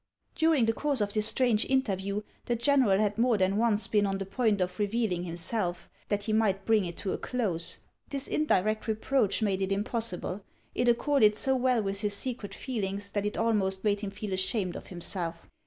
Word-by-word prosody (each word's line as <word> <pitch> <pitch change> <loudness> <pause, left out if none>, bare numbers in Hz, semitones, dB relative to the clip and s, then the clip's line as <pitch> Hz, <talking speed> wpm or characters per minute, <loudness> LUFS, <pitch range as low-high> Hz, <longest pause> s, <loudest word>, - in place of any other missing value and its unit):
During 320 -7 +3
the 225 - +2
course 285 +1 -1
of 205 -1 -1
this 215 0 0
strange 225 -1 +2
interview 205 -6 0 0.2
the 240 - 0
general 235 -5 +3
had 210 +1 0
more 235 -2 +3
than 190 +1 +2
once 225 -2 +3
been 205 -2 +2
on 195 0 -1
the 195 - -4
point 215 0 +1
of 180 +1 -2
revealing 205 -4 0
him 170 -1 -5
self, 175 -1 -3 0.2
that 205 -1 -1
he 215 +1 -1
might 200 -3 +1
bring 220 -3 +3
it 170 -1 -6
to 190 - -2
a - - -3
close. 195 -10 -1 0.3
This 280 -1 -3
indirect 215 -8 +1
re 220 - +1
proach 220 -2 +1
made 195 -2 0
it 190 0 -1
impossible; 205 -2 -2 0.3
it 245 - 0
accorded 240 -3 +4
so 265 +4 +2
well 250 -3 +2
with 195 0 -3
his 205 -2 -1
secret 215 -5 -4
feelings 200 -5 -4
that 205 0 -1
it 210 - -4
almost 195 -4 +1
made 205 -1 +1
him 205 - -3
feel 200 0 -5
ashamed 190 -1 -1
of - - -8
himself. 170 -2 -5
210 Hz, 205 wpm, -29 LUFS, 195-230 Hz, 0.3 s, accorded